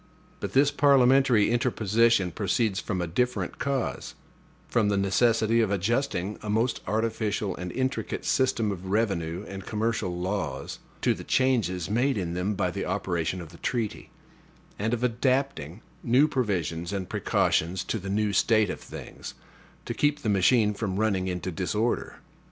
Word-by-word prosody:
But -, -, -5 dB
this 140 Hz, +2 st, +4 dB
parliamentary 135 Hz, -5 st, +4 dB
interposition 115 Hz, -5 st, +2 dB
proceeds 100 Hz, +2 st, 0 dB
from 95 Hz, -4 st, -2 dB
a -, -, -1 dB
different 125 Hz, +9 st, -1 dB
cause: 140 Hz, -3 st, -2 dB, 0.5 s
from 110 Hz, -4 st, +2 dB
the 100 Hz, -, +1 dB
necessity 110 Hz, +3 st, +3 dB
of 110 Hz, -, +1 dB
adjusting 100 Hz, -1 st, -1 dB
a 105 Hz, -, -6 dB
most 115 Hz, +4 st, +1 dB
artificial 110 Hz, -2 st, -1 dB
and 90 Hz, 0 st, -6 dB
intricate 130 Hz, +1 st, -2 dB
system 115 Hz, -5 st, +1 dB
of 95 Hz, -1 st, -6 dB
revenue 95 Hz, -4 st, -1 dB
and 95 Hz, 0 st, -7 dB
commercial 105 Hz, -5 st, -2 dB
laws, 90 Hz, -8 st, -3 dB, 0.2 s
to -, -, +4 dB
the -, -, -8 dB
changes 105 Hz, -10 st, +1 dB
made 125 Hz, +5 st, +1 dB
in 85 Hz, -3 st, -2 dB
them 90 Hz, +4 st, -1 dB
by 95 Hz, -2 st, 0 dB
the -, -, -4 dB
operation 85 Hz, +1 st, -2 dB
of 85 Hz, -, -9 dB
the 85 Hz, -, -15 dB
treaty; 115 Hz, -4 st, -3 dB, 0.7 s
and 110 Hz, +3 st, 0 dB
of 120 Hz, -, -6 dB
adapting 120 Hz, -, 0 dB, 0.2 s
new 130 Hz, +5 st, +4 dB
provisions 90 Hz, -, -2 dB
and 95 Hz, -2 st, -3 dB
precautions 85 Hz, +2 st, 0 dB
to 110 Hz, -, -3 dB
the 95 Hz, 0 st, -6 dB
new 105 Hz, +1 st, 0 dB
state 110 Hz, 0 st, +3 dB
of -, -, -7 dB
things, -, -, -9 dB, 0.5 s
to -, -, -3 dB
keep 145 Hz, 0 st, +1 dB
the 110 Hz, -, 0 dB
machine 105 Hz, +2 st, +3 dB
from 100 Hz, -2 st, -3 dB
running 100 Hz, -4 st, +1 dB
into 90 Hz, 0 st, -3 dB
disorder. 105 Hz, +7 st, -1 dB
105 Hz, 155 wpm, -27 LUFS, 95-120 Hz, 0.7 s, this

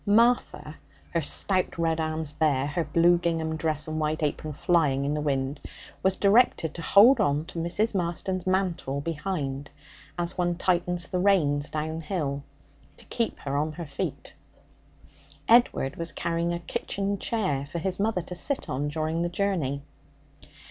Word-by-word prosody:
Martha, 220 Hz, -7 st, +2 dB, 0.3 s
her 170 Hz, -, +1 dB
stout 185 Hz, +5 st, 0 dB
red 165 Hz, -1 st, +1 dB
arms 155 Hz, -1 st, -2 dB
bare, 150 Hz, -3 st, +1 dB
her 145 Hz, +4 st, -1 dB
blue 170 Hz, +2 st, +4 dB
gingham 165 Hz, -2 st, -1 dB
dress 155 Hz, -1 st, -1 dB
and 155 Hz, 0 st, -3 dB
white 155 Hz, +1 st, -1 dB
apron 150 Hz, +1 st, -2 dB
flying 145 Hz, -3 st, +2 dB
in 145 Hz, -, 0 dB
the 150 Hz, -, -1 dB
wind, 140 Hz, -1 st, -1 dB, 0.4 s
was 190 Hz, 0 st, +2 dB
directed 200 Hz, -, +3 dB
to 170 Hz, -, -7 dB
hold 215 Hz, +10 st, +6 dB
on 145 Hz, +2 st, +1 dB
to 165 Hz, -, -6 dB
Mrs. 190 Hz, +7 st, 0 dB
Marston's 185 Hz, 0 st, -2 dB
mantle 185 Hz, -7 st, 0 dB
behind 150 Hz, -4 st, -3 dB, 0.5 s
as 175 Hz, 0 st, -2 dB
one 175 Hz, -1 st, 0 dB
tightens 180 Hz, 0 st, 0 dB
the 180 Hz, -, -1 dB
reins 150 Hz, -7 st, +2 dB
downhill 155 Hz, -2 st, -3 dB, 0.6 s
to -, -, -14 dB
keep 230 Hz, -2 st, -2 dB
her 140 Hz, 0 st, -3 dB
on 155 Hz, +2 st, 0 dB
her 170 Hz, +1 st, -6 dB
feet. 140 Hz, -2 st, -5 dB, 1.1 s
Edward 230 Hz, -, +4 dB
was 165 Hz, 0 st, -2 dB
carrying 170 Hz, 0 st, -1 dB
a 170 Hz, -, -1 dB
kitchen 195 Hz, +4 st, -3 dB
chair 190 Hz, -12 st, -1 dB
for 160 Hz, -, -5 dB
his 185 Hz, +3 st, -2 dB
mother 205 Hz, -3 st, 0 dB
to 180 Hz, -, -7 dB
sit 270 Hz, +10 st, -2 dB
on 140 Hz, +3 st, -1 dB
during 155 Hz, +2 st, -1 dB
the 175 Hz, -, 0 dB
journey. 170 Hz, -8 st, -1 dB
165 Hz, 155 wpm, -27 LUFS, 150-185 Hz, 1.1 s, hold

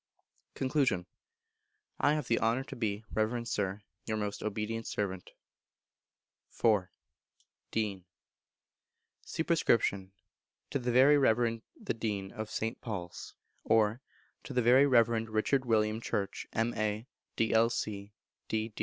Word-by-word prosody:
Con. 130 Hz, -9 st, +1 dB, 0.9 s
I 145 Hz, -, +4 dB
have 150 Hz, -, -3 dB
the 115 Hz, -, +2 dB
honour 115 Hz, +4 st, +1 dB
to -, -, -9 dB
be, 110 Hz, -2 st, -2 dB
Reverend 115 Hz, +2 st, 0 dB
Sir, 100 Hz, -1 st, -2 dB, 0.2 s
Your 110 Hz, -, -1 dB
most 105 Hz, -1 st, -3 dB
obedient 110 Hz, +2 st, -3 dB
servant. 95 Hz, -3 st, -3 dB, 1.3 s
iv. 105 Hz, -5 st, +4 dB, 0.8 s
Dean. 100 Hz, -5 st, -2 dB, 1.2 s
Sup. 160 Hz, -, -3 dB
To 100 Hz, -, -1 dB
the 125 Hz, -1 st, -1 dB
Very 135 Hz, +4 st, +6 dB
Reverend 115 Hz, -3 st, +2 dB, 0.2 s
The -, -, -2 dB
Dean 105 Hz, -4 st, -3 dB
of 110 Hz, 0 st, -6 dB
St. 115 Hz, +2 st, -3 dB
Paul's; 90 Hz, -7 st, -6 dB, 0.3 s
or, 110 Hz, +2 st, +3 dB, 0.4 s
To -, -, -7 dB
the 125 Hz, -, +2 dB
Very 130 Hz, +4 st, +6 dB
Reverend 115 Hz, -3 st, +3 dB
Richard 120 Hz, +5 st, +1 dB
William 110 Hz, -1 st, +2 dB
Church, 100 Hz, -3 st, -3 dB
M.A., 110 Hz, -1 st, -1 dB, 0.3 s
D.C.L., 115 Hz, +1 st, +3 dB, 0.8 s
D. 110 Hz, 0 st, -2 dB
110 Hz, 115 wpm, -31 LUFS, 105-120 Hz, 1.3 s, Very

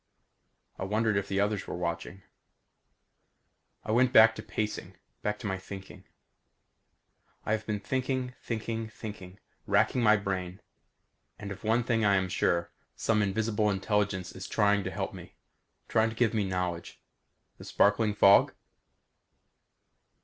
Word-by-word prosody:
I -, -, -3 dB
wondered 110 Hz, +2 st, +1 dB
if 100 Hz, -, -1 dB
the 95 Hz, -, -1 dB
others 105 Hz, 0 st, 0 dB
were -, -, -4 dB
watching. 85 Hz, +2 st, -4 dB, 1.6 s
I 110 Hz, -, -3 dB
went 125 Hz, +2 st, +3 dB
back 110 Hz, -1 st, +8 dB
to -, -, -7 dB
pacing; 105 Hz, -4 st, -4 dB, 0.2 s
back 105 Hz, 0 st, -1 dB
to 115 Hz, -, -10 dB
my 95 Hz, -2 st, -2 dB
thinking. 95 Hz, 0 st, -10 dB, 1.4 s
I -, -, -1 dB
have 110 Hz, 0 st, -1 dB
been 105 Hz, -1 st, -1 dB
thinking, 130 Hz, +3 st, -2 dB
thinking, 115 Hz, -1 st, -4 dB
thinking; 105 Hz, -4 st, -9 dB, 0.3 s
wracking 125 Hz, -, +2 dB
my 110 Hz, -2 st, +5 dB
brain. 95 Hz, -2 st, -4 dB, 0.8 s
And 100 Hz, -1 st, -7 dB
of 100 Hz, -, -8 dB
one 115 Hz, +3 st, +2 dB
thing 115 Hz, -2 st, +1 dB
I 100 Hz, -1 st, +4 dB
am 95 Hz, -1 st, 0 dB
sure. 85 Hz, -1 st, 0 dB, 0.2 s
Some 110 Hz, -2 st, +1 dB
invisible 105 Hz, +1 st, 0 dB
intelligence 100 Hz, -2 st, -1 dB
is 95 Hz, -, -8 dB
trying 105 Hz, -2 st, +2 dB
to -, -, -1 dB
help -, -, -4 dB
me; -, -, -11 dB, 0.5 s
trying 110 Hz, 0 st, +2 dB
to 110 Hz, -, -8 dB
give 115 Hz, -1 st, +2 dB
me 105 Hz, -3 st, +1 dB
knowledge. 90 Hz, -2 st, -3 dB, 0.6 s
The -, -, -10 dB
sparkling 105 Hz, +1 st, +2 dB
fog? 100 Hz, -1 st, +6 dB
105 Hz, 140 wpm, -29 LUFS, 95-110 Hz, 1.6 s, back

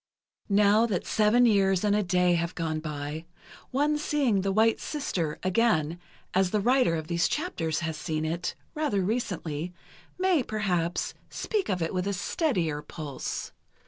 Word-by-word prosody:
Now 205 Hz, +3 st, +5 dB
that 195 Hz, -6 st, -2 dB
seven 220 Hz, +3 st, +4 dB
years 195 Hz, -4 st, +3 dB
and 205 Hz, -1 st, +3 dB
a 210 Hz, -, +3 dB
day 180 Hz, -2 st, +2 dB
have 170 Hz, +1 st, -1 dB
gone 160 Hz, -2 st, -2 dB
by, 150 Hz, +1 st, -5 dB, 0.4 s
one 295 Hz, +3 st, +1 dB
seeing 275 Hz, -9 st, +1 dB
"The 195 Hz, +1 st, 0 dB
White 220 Hz, +3 st, +3 dB
Sister" 180 Hz, -, -2 dB
again, 180 Hz, -5 st, +2 dB, 0.3 s
as 190 Hz, 0 st, +3 dB
the 210 Hz, -, +1 dB
writer 245 Hz, -4 st, +3 dB
of 160 Hz, -1 st, -3 dB
these 170 Hz, +1 st, +1 dB
chapters 170 Hz, -, -2 dB
has 160 Hz, -2 st, -3 dB
seen 155 Hz, +1 st, -2 dB
it, 170 Hz, +2 st, -2 dB, 0.2 s
rather 300 Hz, -, 0 dB
recently—may, 185 Hz, -, -2 dB
perhaps, 180 Hz, -7 st, -1 dB, 0.2 s
speak 425 Hz, -4 st, -2 dB
of 180 Hz, -4 st, 0 dB
it 165 Hz, -, -2 dB
with 185 Hz, +1 st, -1 dB
a 200 Hz, -, 0 dB
steadier 180 Hz, -, 0 dB
pulse. 150 Hz, -4 st, -5 dB
185 Hz, 150 wpm, -28 LUFS, 165-225 Hz, 0.4 s, Now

